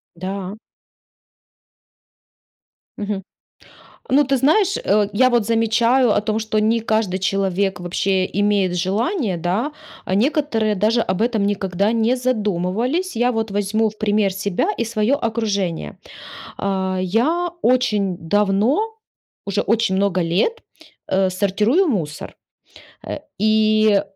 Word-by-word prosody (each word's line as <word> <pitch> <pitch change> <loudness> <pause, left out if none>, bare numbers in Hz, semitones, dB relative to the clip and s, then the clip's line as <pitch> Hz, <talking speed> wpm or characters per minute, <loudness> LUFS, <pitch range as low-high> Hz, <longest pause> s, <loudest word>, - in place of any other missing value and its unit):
Да. 190 +2 -5 2.4
Мгм. 205 -2 -3 0.9
Ну, 280 +3 +4
ты 270 0 +1
знаешь, 355 - +3
э, 205 0 +1
я 255 +5 +4
вот 240 -3 +2
замечаю 230 +3 +2
о - - +3
том, 215 +1 -1
что 220 -1 -1
не 220 +2 +2
каждый 215 -4 0
человек 195 0 0
вообще 185 +1 0
имеет 200 -3 +1
желание, 205 - -1
да. 190 - -1 0.3
А 185 - -1
некоторые 225 -3 +1
даже 220 +4 +2
об 185 -2 -2
этом 225 -3 +1
никогда 200 0 0
не 230 +2 +2
задумывались. 240 - -1
Я 245 +2 +2
вот 225 -3 -2
возьму 205 +2 0
в 215 - -17
пример 210 -2 +1
себя 195 - -1
и 235 - 0
свое 225 +2 0
окружение. 220 - -2 0.6
А, 190 -1 -1
я 270 - +1
очень 210 -7 +1
давно, 205 - +1 0.7
уже 200 +1 -1
очень 220 -3 +1
много 190 -1 +1
лет, 185 - 0 0.5
э, 190 0 +2
сортирую 210 - +1
мусор. 170 - -3 0.7
Э, - - -4 0.2
и 215 -1 +3
210 Hz, 120 wpm, -20 LUFS, 195-230 Hz, 2.4 s, Ну